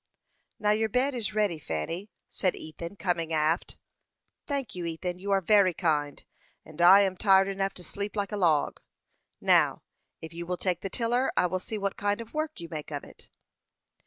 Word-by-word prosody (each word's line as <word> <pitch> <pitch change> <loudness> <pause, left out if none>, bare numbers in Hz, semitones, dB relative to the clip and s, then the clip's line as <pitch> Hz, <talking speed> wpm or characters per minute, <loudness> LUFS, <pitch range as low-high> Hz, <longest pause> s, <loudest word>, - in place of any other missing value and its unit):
"Now 210 -1 +2
your 220 +1 +1
bed 260 +5 +1
is 230 -4 -3
ready, 205 -7 +1
Fanny," 155 - -4 0.2
said 185 -2 0
Ethan, 170 +4 -8
coming 175 -4 -1
aft. 160 +2 0 0.7
"Thank 275 -6 -2
you, 180 - -5
Ethan; 175 +2 -4
you 200 +2 -6
are 195 -1 +3
very 190 -2 +4
kind, 150 -4 -1 0.4
and 155 +2 -8
I 190 +3 +9
am 190 -2 +1
tired 195 0 +5
enough 195 0 -2
to 180 - -9
sleep 200 +5 -5
like 205 -1 -2
a - - -2
log. 165 -6 +2 0.6
Now, - - +3 0.4
if 160 0 -9
you 170 0 -6
will 180 0 -2
take 180 0 -1
the 195 - -4
tiller, 240 +4 0
I - - +4
will 185 +1 -1
see 215 +4 -5
what 200 -1 -2
kind 205 +1 0
of 230 0 -9
work 310 -5 -3
you 170 - -7
make 155 -3 -6
of 145 -2 -5
it." - - -14
190 Hz, 190 wpm, -28 LUFS, 170-210 Hz, 0.7 s, I